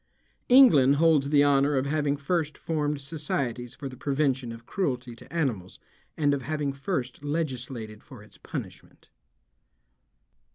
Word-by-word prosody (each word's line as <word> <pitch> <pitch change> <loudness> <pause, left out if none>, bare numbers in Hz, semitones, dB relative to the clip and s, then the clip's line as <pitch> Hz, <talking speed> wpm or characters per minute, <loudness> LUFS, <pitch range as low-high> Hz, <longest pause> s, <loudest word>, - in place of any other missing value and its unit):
England 155 - +7
holds 150 -2 +3
the 145 -1 +5
honor 140 0 +3
of 130 - 0
having 145 0 0
first 155 +1 -1
formed 150 -2 -2
societies 135 -5 -4
for 140 - -6
the 130 - -8
prevention 135 -2 -1
of 115 0 -10
cruelty 125 -10 -3
to - - -16
animals 125 - -2 0.4
and 145 -2 +2
of 140 - -1
having 145 0 -2
first 135 -3 -4
legislated 130 -8 -4
for - - -13
its - - -18
punishment. - - -9
140 Hz, 135 wpm, -27 LUFS, 130-150 Hz, 0.4 s, England